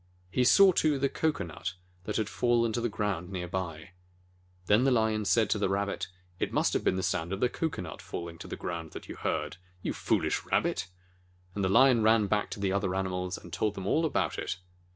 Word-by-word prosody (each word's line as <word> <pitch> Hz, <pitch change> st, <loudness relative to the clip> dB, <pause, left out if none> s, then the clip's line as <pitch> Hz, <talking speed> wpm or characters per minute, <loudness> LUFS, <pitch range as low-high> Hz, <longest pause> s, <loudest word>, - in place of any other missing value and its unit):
He 125 Hz, -, +2 dB
saw, 195 Hz, +9 st, +7 dB
too, 155 Hz, -4 st, +2 dB
the 135 Hz, 0 st, +1 dB
cocoanut 100 Hz, -, -2 dB, 0.3 s
that 105 Hz, -, -2 dB
had 110 Hz, -2 st, 0 dB
fallen 115 Hz, 0 st, +1 dB
to 120 Hz, -, -1 dB
the 120 Hz, -, 0 dB
ground 100 Hz, -5 st, -2 dB
near 90 Hz, -2 st, -4 dB
by. 85 Hz, -3 st, -4 dB, 0.7 s
Then 105 Hz, +6 st, +4 dB
the 135 Hz, -, +4 dB
Lion 110 Hz, -3 st, +2 dB
said 110 Hz, +1 st, +3 dB
to 105 Hz, -, +2 dB
the 100 Hz, -, +1 dB
Rabbit, 100 Hz, -1 st, -1 dB, 0.3 s
"It -, -, -1 dB
must -, -, +2 dB
have -, -, 0 dB
been -, -, +2 dB
the 95 Hz, -, -2 dB
sound 90 Hz, -2 st, -1 dB
of 95 Hz, -, -2 dB
the 125 Hz, -, +2 dB
cocoanut 145 Hz, -, -4 dB
falling 85 Hz, -1 st, -6 dB
to -, -, -8 dB
the -, -, -5 dB
ground 85 Hz, -2 st, -5 dB
that -, -, -8 dB
you -, -, -7 dB
heard. 75 Hz, +1 st, -2 dB, 0.3 s
You -, -, -1 dB
foolish -, -, 0 dB
Rabbit 80 Hz, -, 0 dB, 0.3 s
!" 90 Hz, 0 st, -34 dB
And 100 Hz, -, -2 dB
the 95 Hz, -, +2 dB
Lion 125 Hz, +3 st, +6 dB
ran 110 Hz, 0 st, +4 dB
back 105 Hz, +1 st, 0 dB
to -, -, -6 dB
the 100 Hz, -1 st, 0 dB
other 95 Hz, -2 st, 0 dB
animals, 90 Hz, -1 st, -2 dB
and 85 Hz, -, -12 dB
told 105 Hz, +3 st, 0 dB
them 95 Hz, -, -5 dB
all 155 Hz, +11 st, +2 dB
about 155 Hz, -6 st, 0 dB
it. 95 Hz, -, -3 dB
100 Hz, 220 wpm, -29 LUFS, 90-115 Hz, 0.7 s, saw